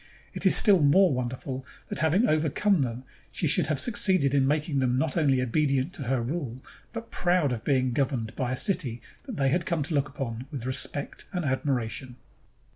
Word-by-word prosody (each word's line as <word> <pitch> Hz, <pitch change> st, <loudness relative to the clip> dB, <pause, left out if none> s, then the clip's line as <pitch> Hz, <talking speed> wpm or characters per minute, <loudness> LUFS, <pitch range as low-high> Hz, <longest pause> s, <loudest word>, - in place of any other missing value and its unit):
It -, -, +2 dB
is -, -, +7 dB
still 200 Hz, -6 st, +5 dB
more 160 Hz, +4 st, +4 dB
wonderful 130 Hz, +1 st, -4 dB, 0.3 s
that -, -, -3 dB
having 160 Hz, +9 st, +2 dB
overcome 160 Hz, +4 st, +1 dB
them, 125 Hz, -1 st, -3 dB, 0.3 s
she -, -, -2 dB
should -, -, +3 dB
have 155 Hz, -3 st, -1 dB
succeeded 185 Hz, -, +3 dB
in 135 Hz, -1 st, +3 dB
making 150 Hz, 0 st, 0 dB
them 125 Hz, -1 st, +1 dB
not 150 Hz, +1 st, -1 dB
only 140 Hz, -6 st, +2 dB
obedient 135 Hz, +4 st, 0 dB
to 175 Hz, -, -7 dB
her 125 Hz, -1 st, 0 dB
rule, 130 Hz, -2 st, -5 dB, 0.3 s
but 230 Hz, -1 st, -8 dB
proud 175 Hz, -5 st, +1 dB
of 115 Hz, -3 st, -4 dB
being 130 Hz, -3 st, +1 dB
governed 125 Hz, -5 st, -2 dB
by 125 Hz, -2 st, -2 dB
a -, -, -1 dB
city 125 Hz, -, -1 dB, 0.3 s
that 250 Hz, -8 st, -7 dB
they 135 Hz, -1 st, +2 dB
had 170 Hz, +5 st, -1 dB
come 165 Hz, -4 st, 0 dB
to 160 Hz, +3 st, -4 dB
look 145 Hz, -1 st, 0 dB
upon 130 Hz, -3 st, -6 dB
with 135 Hz, -6 st, -6 dB
respect 140 Hz, +2 st, -1 dB
and 180 Hz, -3 st, -2 dB
admiration. 130 Hz, -2 st, -2 dB
140 Hz, 195 wpm, -27 LUFS, 130-160 Hz, 0.3 s, is